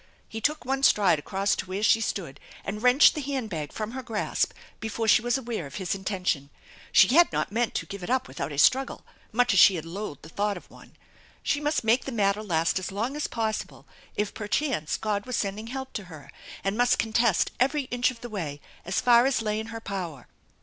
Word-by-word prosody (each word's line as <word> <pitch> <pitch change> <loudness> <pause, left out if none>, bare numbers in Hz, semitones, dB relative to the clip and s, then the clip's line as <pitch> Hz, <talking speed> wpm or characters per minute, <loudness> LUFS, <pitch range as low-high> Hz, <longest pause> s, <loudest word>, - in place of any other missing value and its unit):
He 225 - -7
took 300 +2 0
one 270 +1 -1
stride 195 - +4
across 195 +6 0
to 185 - -5
where 190 +3 -3
she 225 +1 +4
stood 170 -10 -3 0.3
and 210 +2 -4
wrenched 250 +4 +6
the 305 - -4
hand 265 -6 -3
bag 155 -4 -4
from 215 0 -4
her 260 +2 -5
grasp 225 -4 -1 0.3
before 220 0 -3
she 215 - +6
was 240 +3 +1
aware 230 - -4
of 135 - -12
his 185 -3 -2
intention. 185 -7 -2 0.4
She 185 - +7
had 340 +6 +5
not - - -1
meant 235 +2 0
to - - -1
give 200 -1 -8
it 175 - -6
up 260 +1 +1
without - - -5
a 145 - -6
struggle, 265 - +3 0.3
much 245 0 +3
as 195 - +5
she 185 -2 +7
loathed 165 -1 -7
the 160 - -11
thought 205 +3 -1
of - - -14
one. - - -16 0.5
She 290 - +1
must 295 -2 0
make 225 +3 +3
the 270 - -4
matter 205 -2 +1
last 170 -3 +1
as 185 - -5
long 230 +8 -2
as 300 - -2
possible, 220 -2 -3 0.3
if 210 0 -1
perchance 210 - -1
God 210 +1 -2
was 255 - -2
sending 205 +2 -3
help 265 +2 -6
to 210 - -5
her, 155 -5 -12 0.3
and 195 +1 0
must 245 +1 +3
contest 225 -3 +2
every 275 +3 +2
inch 245 0 +2
of 245 -2 -9
the 240 - -7
way 160 -9 -4 0.2
as 180 +2 -1
far 240 +1 +6
as 250 -4 0
lay 215 0 -1
in 220 - -5
her 225 0 -6
power. 180 - -6
215 Hz, 220 wpm, -27 LUFS, 190-245 Hz, 0.5 s, She